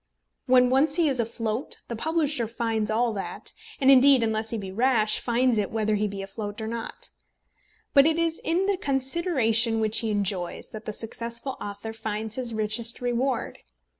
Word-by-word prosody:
When 250 0 +5
once 280 +3 +3
he 335 -2 +3
is 265 -3 0
afloat, 230 +1 -3
the 235 - -4
publisher 300 -2 0
finds 225 -2 -2
all 230 +1 +1
that; 195 -2 -5 0.3
and 270 -1 +5
indeed, 265 -1 +6
unless 220 0 -1
he 230 - -2
be 195 -3 -6
rash, 220 -1 +3
finds 240 -1 +1
it 200 - -1
whether 215 -1 0
he 210 0 +1
be 195 -1 -6
afloat 205 +2 -6
or 220 - -4
not. 230 +1 -6 0.8
But 280 +1 +7
it 320 0 +1
is 330 -1 -1
in 345 +4 +1
the 400 -1 +1
consideration 265 - +1
which 220 0 +1
he 225 - -2
enjoys 195 -4 -2
that 215 0 -9
the - - -3
successful 235 +4 -4
author 205 +2 -6
finds 220 0 -4
his 250 -2 -1
richest 220 +2 0
reward. 245 0 -1
230 Hz, 175 wpm, -26 LUFS, 215-265 Hz, 0.8 s, But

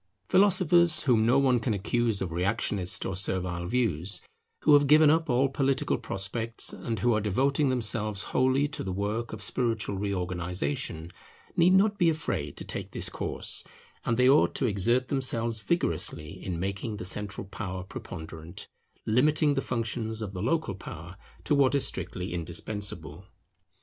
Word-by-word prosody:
Philosophers, 175 -4 +4
whom 115 -4 +3
no 125 +3 +5
one 130 -3 +3
can 115 -2 -1
accuse 110 +1 0
of 90 - -5
reactionist 95 +1 -1
or 95 - -2
servile 90 -2 -1
views, 95 -6 0 0.4
who 150 - +6
have 145 -1 +6
given 150 +1 +7
up 160 0 +1
all 130 +2 +3
political 135 0 0
prospects, 115 +1 -2
and 115 -1 -4
who 120 -1 +3
are 110 - +1
devoting 135 +8 +1
themselves 110 -4 -1
wholly 130 +2 +3
to 150 - -6
the 95 - -3
work 105 +5 -2
of 110 -1 -5
spiritual 115 -5 -1
reorganization, 90 - -3 0.4
need 175 +2 +5
not 200 +2 +3
be 170 - +5
afraid 80 - -2
to - - -6
take - - -5
this - - -5
course; - - -2 0.4
and 115 - 0
they 125 0 +5
ought 140 +3 +4
to 135 - +1
exert 120 +4 +1
themselves 120 -4 0
vigorously 80 - -1
in 90 -3 -3
making 100 +4 -3
the - - -6
central 100 +2 -3
power 95 -2 -5
preponderant, 80 -3 -9 0.4
limiting 145 +6 +3
the 135 - 0
functions 110 -2 -3
of 100 -2 -6
the 90 - -5
local 130 0 0
power 90 -2 -9 0.3
to - - +1
what 140 -1 +4
is 140 - +2
strictly 90 0 -4
indispensable. 90 0 -5
110 Hz, 160 wpm, -28 LUFS, 95-135 Hz, 0.4 s, given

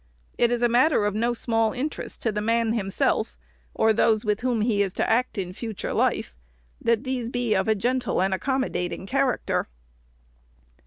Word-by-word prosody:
It 240 - +3
is 245 0 0
a - - +6
matter 245 -1 +3
of 205 - 0
no 235 +3 0
small 225 -2 +1
interest 280 +4 -5
to 225 - +1
the 210 0 -2
man 230 +1 +1
himself, 195 - 0 0.4
or 220 0 +3
those 220 0 +2
with 210 -1 +1
whom 245 -3 0
he 215 -2 +2
is 195 -2 0
to - - 0
act 235 +1 +1
in 180 -2 -3
future 220 0 -5
life, - - 0 0.5
that 230 +1 +1
these 255 -3 -3
be 245 -3 0
of 190 - +1
a 220 - +3
gentle 245 +3 0
and 190 +1 +1
accommodating 190 -4 -2
character. 260 +2 0
230 Hz, 175 wpm, -25 LUFS, 210-245 Hz, 0.5 s, a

